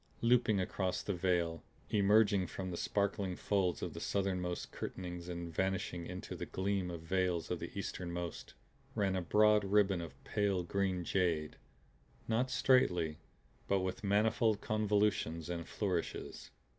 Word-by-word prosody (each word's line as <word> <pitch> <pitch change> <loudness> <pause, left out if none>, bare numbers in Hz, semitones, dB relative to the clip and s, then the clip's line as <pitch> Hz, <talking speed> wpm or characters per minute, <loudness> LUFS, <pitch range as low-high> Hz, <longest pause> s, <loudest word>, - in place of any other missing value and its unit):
Looping 115 -3 +4
across 95 0 -1
the 100 - -1
vale, 85 -2 0 0.3
emerging 100 -2 +4
from 95 +1 -5
the - - -3
sparkling 100 0 -1
folds 95 -4 0
of - - -3
the - - -6
southernmost 90 -3 -1
curtainings 90 -1 -6
and 85 -1 -5
vanishing 95 -1 -1
into 90 0 -6
the - - -5
gleaming 95 -3 -1
veils 85 0 0
of - - -1
the - - -5
easternmost, 85 -2 -5 0.4
ran 95 -2 +1
a 95 - 0
broad 105 +3 +4
ribbon 100 -2 +3
of 85 - -8
pale 100 -3 0
green 95 0 0
jade; 85 -4 0 0.7
not 120 +3 +1
straightly 90 -13 +3 0.5
but 100 -1 +2
with 95 +2 -3
manifold 110 +2 +3
convolutions 105 -6 +1
and 85 -1 -4
flourishes. 95 -5 -3
95 Hz, 135 wpm, -35 LUFS, 90-100 Hz, 0.7 s, Looping